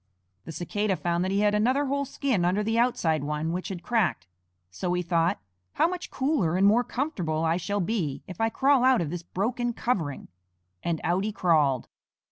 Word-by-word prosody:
The -, -, -6 dB
Cicada 190 Hz, +5 st, -1 dB
found 175 Hz, 0 st, -1 dB
that 185 Hz, -, -1 dB
he 200 Hz, +1 st, +1 dB
had 210 Hz, 0 st, +3 dB
another 255 Hz, +7 st, +2 dB
whole 280 Hz, +1 st, -1 dB
skin 265 Hz, -8 st, -1 dB
under 185 Hz, +4 st, +1 dB
the 225 Hz, +2 st, +1 dB
outside 165 Hz, -, +1 dB
one 150 Hz, +2 st, -2 dB
which 180 Hz, +1 st, -3 dB
had 180 Hz, -3 st, -6 dB
cracked, 215 Hz, -, 0 dB, 0.5 s
so 180 Hz, -, -2 dB
he 180 Hz, 0 st, 0 dB
thought, 170 Hz, 0 st, +1 dB, 0.3 s
"How -, -, +3 dB
much 360 Hz, 0 st, -5 dB
cooler 260 Hz, -, 0 dB
and 195 Hz, -, +4 dB
more 220 Hz, +4 st, +5 dB
comfortable 180 Hz, -, -2 dB
I 165 Hz, +1 st, +2 dB
shall 200 Hz, +3 st, -2 dB
be 175 Hz, -8 st, -2 dB
if 185 Hz, +2 st, -7 dB
I 225 Hz, -, +3 dB
crawl 270 Hz, +2 st, +3 dB
out 260 Hz, -4 st, +5 dB
of 155 Hz, -3 st, -3 dB
this 175 Hz, -1 st, -4 dB
broken 235 Hz, +7 st, -2 dB
covering," 175 Hz, -, -2 dB, 0.5 s
and 170 Hz, -2 st, -1 dB
out 180 Hz, +3 st, +1 dB
he 215 Hz, -, -1 dB
crawled. 150 Hz, -, +2 dB
190 Hz, 195 wpm, -27 LUFS, 170-240 Hz, 0.5 s, more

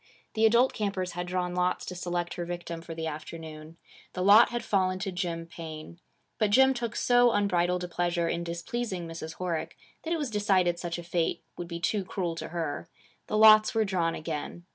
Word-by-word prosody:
The 220 Hz, 0 st, +4 dB
adult 235 Hz, +4 st, +4 dB
campers 195 Hz, -4 st, -2 dB
had 175 Hz, +1 st, -4 dB
drawn 180 Hz, 0 st, -2 dB
lots 180 Hz, 0 st, 0 dB
to -, -, -5 dB
select 175 Hz, -1 st, -3 dB
her 175 Hz, -, -4 dB
victim 170 Hz, -1 st, -5 dB
for 165 Hz, 0 st, -8 dB
the 160 Hz, 0 st, -4 dB
afternoon. 155 Hz, 0 st, -7 dB, 0.4 s
The 180 Hz, -, -2 dB
lot 205 Hz, +4 st, +7 dB
had 240 Hz, -1 st, -3 dB
fallen 185 Hz, -3 st, +1 dB
to 195 Hz, +1 st, -3 dB
Jim 175 Hz, -2 st, -3 dB
Paine. 165 Hz, 0 st, -9 dB, 0.4 s
But 215 Hz, -2 st, +3 dB
Jim 265 Hz, +5 st, +5 dB
took 240 Hz, -2 st, -4 dB
so 245 Hz, 0 st, +4 dB
unbridled 180 Hz, -4 st, +1 dB
a -, -, -3 dB
pleasure 175 Hz, -1 st, 0 dB
in 170 Hz, +1 st, -1 dB
displeasing 175 Hz, +2 st, -4 dB
Mrs. 165 Hz, -1 st, -7 dB
Horick 175 Hz, -3 st, -3 dB, 0.3 s
that 325 Hz, -, -5 dB
it 335 Hz, -, +2 dB
was 290 Hz, -6 st, -3 dB
decided 190 Hz, -5 st, +2 dB
such 170 Hz, -1 st, -3 dB
a 175 Hz, -, -7 dB
fate 170 Hz, -1 st, -1 dB
would 175 Hz, -, -6 dB
be 170 Hz, 0 st, -5 dB
too 200 Hz, +4 st, 0 dB
cruel 180 Hz, -2 st, -3 dB
to -, -, -5 dB
her. 165 Hz, -1 st, -4 dB, 0.4 s
The 215 Hz, -, -1 dB
lots 215 Hz, 0 st, +7 dB
were 220 Hz, -1 st, +3 dB
drawn 175 Hz, -4 st, 0 dB
again. 160 Hz, +2 st, -5 dB
180 Hz, 200 wpm, -28 LUFS, 170-205 Hz, 0.4 s, lot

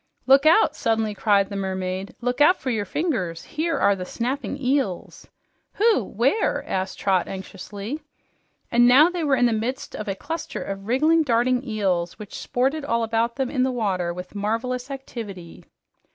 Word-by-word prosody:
"Look 275 Hz, +3 st, +6 dB
out!" 340 Hz, +8 st, +5 dB
suddenly 220 Hz, -2 st, 0 dB
cried 200 Hz, -1 st, +2 dB
the 200 Hz, -, -6 dB
mermaid. 190 Hz, 0 st, -3 dB
"Look 245 Hz, +3 st, -1 dB
out 355 Hz, +6 st, +6 dB
for 260 Hz, -, -2 dB
your 215 Hz, -3 st, -1 dB
fingers! 190 Hz, -, -2 dB
Here 325 Hz, +1 st, -2 dB
are 200 Hz, -, +3 dB
the 185 Hz, -, -5 dB
snapping 255 Hz, +8 st, -3 dB
eels." 260 Hz, -8 st, -2 dB, 0.5 s
"Who? 430 Hz, -, +3 dB
Where?" 245 Hz, -, 0 dB
asked 190 Hz, 0 st, -2 dB
Trot 190 Hz, -3 st, +1 dB
anxiously. 200 Hz, +7 st, -7 dB, 0.7 s
And 240 Hz, 0 st, +5 dB
now 290 Hz, +8 st, +7 dB
they 350 Hz, -2 st, -3 dB
were 285 Hz, -3 st, +3 dB
in 245 Hz, -1 st, +3 dB
the 235 Hz, -, +3 dB
midst 230 Hz, +4 st, -3 dB
of 215 Hz, -, -6 dB
a 195 Hz, -, -2 dB
cluster 325 Hz, +9 st, -5 dB
of 195 Hz, 0 st, -6 dB
wriggling, 310 Hz, +7 st, +3 dB
darting 250 Hz, -2 st, +2 dB
eels 190 Hz, -8 st, -1 dB
which 210 Hz, -2 st, -10 dB
sported 270 Hz, +5 st, -1 dB
all 230 Hz, -4 st, 0 dB
around 230 Hz, +1 st, 0 dB
them 265 Hz, -2 st, -2 dB
in 260 Hz, -, 0 dB
the 260 Hz, -, +2 dB
water 190 Hz, -8 st, -1 dB
with 180 Hz, +1 st, -8 dB
marvelous 230 Hz, +5 st, -2 dB
activity. 220 Hz, -10 st, -8 dB
235 Hz, 170 wpm, -23 LUFS, 195-270 Hz, 0.7 s, now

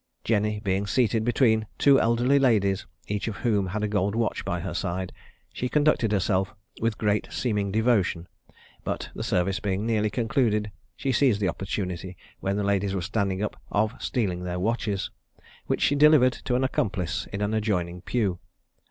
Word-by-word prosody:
Jenny 105 Hz, -1 st, +1 dB
being 100 Hz, 0 st, -1 dB
seated 115 Hz, -1 st, +2 dB
between 110 Hz, -2 st, +2 dB
two 140 Hz, -1 st, +5 dB
elderly 120 Hz, +5 st, +3 dB
ladies, 105 Hz, -7 st, +2 dB, 0.2 s
each 105 Hz, -1 st, -2 dB
of 110 Hz, -, -3 dB
whom 105 Hz, -5 st, +2 dB
had 105 Hz, +4 st, -3 dB
a -, -, +1 dB
gold 100 Hz, 0 st, 0 dB
watch 115 Hz, -1 st, -1 dB
by -, -, -2 dB
her -, -, -4 dB
side, 95 Hz, +1 st, -3 dB, 0.4 s
she 125 Hz, -, -2 dB
conducted 145 Hz, -7 st, +2 dB
herself 95 Hz, -1 st, +1 dB, 0.3 s
with 115 Hz, -1 st, 0 dB
great 105 Hz, -1 st, 0 dB
seeming 105 Hz, -5 st, -1 dB
devotion; 105 Hz, -6 st, +1 dB, 0.6 s
but, -, -, -4 dB
the -, -, -6 dB
service 95 Hz, +2 st, 0 dB
being 100 Hz, +1 st, -1 dB
nearly 110 Hz, -2 st, +1 dB
concluded, 110 Hz, -2 st, 0 dB, 0.2 s
she 135 Hz, -, -1 dB
seized 130 Hz, -6 st, +3 dB
the 100 Hz, -, +1 dB
opportunity, 90 Hz, 0 st, -4 dB, 0.2 s
when 100 Hz, +1 st, -1 dB
the 105 Hz, -, 0 dB
ladies 100 Hz, -1 st, +1 dB
were 95 Hz, -, -1 dB
standing 100 Hz, -1 st, -1 dB
up, 105 Hz, -, -4 dB
of 105 Hz, +2 st, +1 dB
stealing 95 Hz, -8 st, -1 dB
their 90 Hz, 0 st, -3 dB
watches, 105 Hz, -1 st, -1 dB, 0.6 s
which -, -, 0 dB
she -, -, +4 dB
delivered 145 Hz, -3 st, +6 dB
to 125 Hz, -, -2 dB
an 130 Hz, -, +1 dB
accomplice 100 Hz, -8 st, -1 dB
in 100 Hz, -, -4 dB
an 105 Hz, +1 st, -1 dB
adjoining 90 Hz, -5 st, -1 dB
pew. 95 Hz, -4 st, -1 dB
105 Hz, 170 wpm, -26 LUFS, 95-115 Hz, 0.6 s, delivered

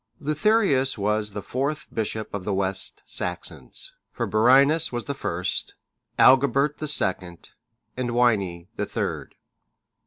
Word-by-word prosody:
] -, -, -43 dB
Leutherius 155 Hz, -, +2 dB
was 105 Hz, +1 st, 0 dB
the 100 Hz, -, -5 dB
fourth 140 Hz, +4 st, -2 dB
bishop 110 Hz, 0 st, -3 dB
of 100 Hz, -2 st, -4 dB
the 100 Hz, 0 st, -1 dB
West 95 Hz, 0 st, 0 dB
Saxons; 85 Hz, -6 st, -4 dB, 0.2 s
for -, -, -2 dB
Birinus 140 Hz, +8 st, +4 dB
was 120 Hz, -1 st, -3 dB
the 140 Hz, -, -2 dB
first, 90 Hz, -9 st, -3 dB, 0.4 s
Agilbert 140 Hz, +2 st, +5 dB
the 155 Hz, -, -3 dB
second, 90 Hz, -, -2 dB, 0.4 s
and 125 Hz, -1 st, -2 dB
Wini 105 Hz, -8 st, +1 dB
the 105 Hz, -, -2 dB
third. -, -, -4 dB
120 Hz, 130 wpm, -25 LUFS, 100-140 Hz, 0.4 s, Agilbert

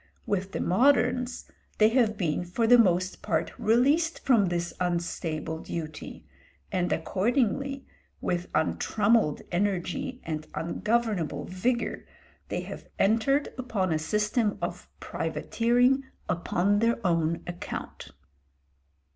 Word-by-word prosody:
With 195 Hz, -1 st, -1 dB
the -, -, -3 dB
moderns 250 Hz, +3 st, +2 dB, 0.3 s
they 215 Hz, 0 st, +6 dB
have 225 Hz, -3 st, +2 dB
been 170 Hz, -3 st, 0 dB
for 180 Hz, +7 st, -1 dB
the 245 Hz, +2 st, +7 dB
most 185 Hz, -3 st, +2 dB
part 160 Hz, -2 st, -1 dB
released 285 Hz, +9 st, +2 dB
from 230 Hz, -7 st, +4 dB
this 175 Hz, 0 st, -2 dB
unstable 170 Hz, -3 st, -2 dB
duty, 155 Hz, -2 st, -7 dB, 0.5 s
and 180 Hz, -1 st, 0 dB
accordingly, 250 Hz, -, 0 dB, 0.3 s
with 175 Hz, 0 st, -2 dB
untrammelled 205 Hz, +2 st, +2 dB
energy 205 Hz, +8 st, -1 dB
and 155 Hz, -1 st, -4 dB
ungovernable 210 Hz, +1 st, -1 dB
vigour, 235 Hz, +7 st, -1 dB, 0.5 s
they -, -, -2 dB
have -, -, -9 dB
entered 230 Hz, +8 st, +2 dB
upon 200 Hz, -9 st, -1 dB
a 155 Hz, -, 0 dB
system 210 Hz, +6 st, 0 dB
of -, -, -5 dB
privateering 245 Hz, +3 st, +1 dB, 0.2 s
upon 185 Hz, +4 st, +1 dB
their 230 Hz, +1 st, +2 dB
own 165 Hz, -1 st, +1 dB
account. 175 Hz, 0 st, -6 dB
205 Hz, 110 wpm, -27 LUFS, 175-240 Hz, 0.5 s, the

